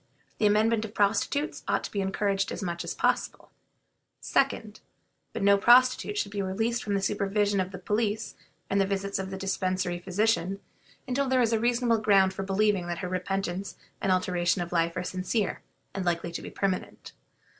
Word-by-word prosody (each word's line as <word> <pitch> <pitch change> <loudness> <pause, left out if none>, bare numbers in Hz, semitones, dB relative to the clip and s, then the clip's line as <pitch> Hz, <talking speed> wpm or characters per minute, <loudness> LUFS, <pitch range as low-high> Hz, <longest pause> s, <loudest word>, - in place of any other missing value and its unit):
The 210 - +4
amendment 215 +2 +3
of 220 0 -8
prostitutes 220 +9 0
ought - - +1
to - - -6
be 200 - -1
encouraged 195 0 0
as - - -5
much 170 -2 -3
as - - -5
possible; - - -1 0.7
2d. 220 -5 0 0.5
But - - -4
no 200 0 +5
prostitute 240 -2 +5
should 200 - -1
be 205 -1 -2
released 225 +5 -1
from 205 -1 -1
the 195 - -1
supervision 205 0 +1
of 185 0 -1
the 190 - -7
police 210 +3 -1 0.3
and 200 0 +2
the 195 - +1
visits 200 0 -2
of 190 0 -4
the 190 - -5
Dispensary 185 -2 -1
physicians 195 0 0 0.5
until 270 +2 0
there 260 0 +2
is 230 -2 +3
reasonable 235 0 +2
ground 195 -3 +4
for 195 - -5
believing 195 -1 +1
that 175 -1 -3
her - - -2
repentance 185 +1 -3 0.3
and 195 - +1
alteration 180 0 +1
of 175 - -9
life 170 0 0
are 180 - -1
sincere 185 +3 -2 0.3
and 195 - -3
likely 170 -1 -1
to 170 - -5
be - - -7
permanent. 190 -2 -3
200 Hz, 180 wpm, -28 LUFS, 185-215 Hz, 0.7 s, no